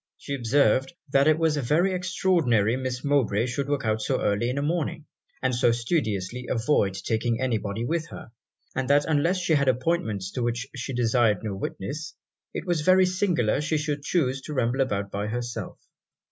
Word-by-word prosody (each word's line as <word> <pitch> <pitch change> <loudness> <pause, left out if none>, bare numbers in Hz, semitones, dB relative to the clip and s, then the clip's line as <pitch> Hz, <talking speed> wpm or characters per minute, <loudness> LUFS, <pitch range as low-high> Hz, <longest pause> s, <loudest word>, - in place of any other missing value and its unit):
She 140 - -6
observed 135 +2 +2 0.2
'that 140 +1 +4
it 155 0 +5
was 160 -2 +1
very 155 +8 +2
extraordinary 165 - +2
Miss 130 -1 -3
Mowbray 130 -7 +2
should 135 +3 -3
walk 145 -4 -1
out 110 0 0
so - - 0
early 105 +4 0
in 130 - -2
a 140 - 0
morning, 155 -1 -2 0.4
and 130 0 +1
so 120 0 +3
studiously 115 - -2
avoid 115 -5 +1
taking 115 +4 -1
any 125 -4 0
body 105 +3 -4
with 165 +4 -1
her - - -10 0.4
and 135 0 -2
that 145 +1 +4
unless 160 +4 +2
she 175 -3 0
had 140 -2 +2
appointments 125 - 0
to 125 - -4
which 120 +1 -1
she 130 +1 -4
desired 115 -4 +2
no 105 -2 -3
witness, 140 - -5 0.4
it - - -5
was 175 -4 0
very 185 +3 +5
singular 180 - +1
she 155 +1 0
should 150 -1 -2
chuse 135 -4 0
to 150 +2 -7
ramble 125 +1 +1
about 100 -6 -1
by 100 +1 -2
herself.' 120 +2 -4
130 Hz, 185 wpm, -26 LUFS, 115-150 Hz, 0.4 s, it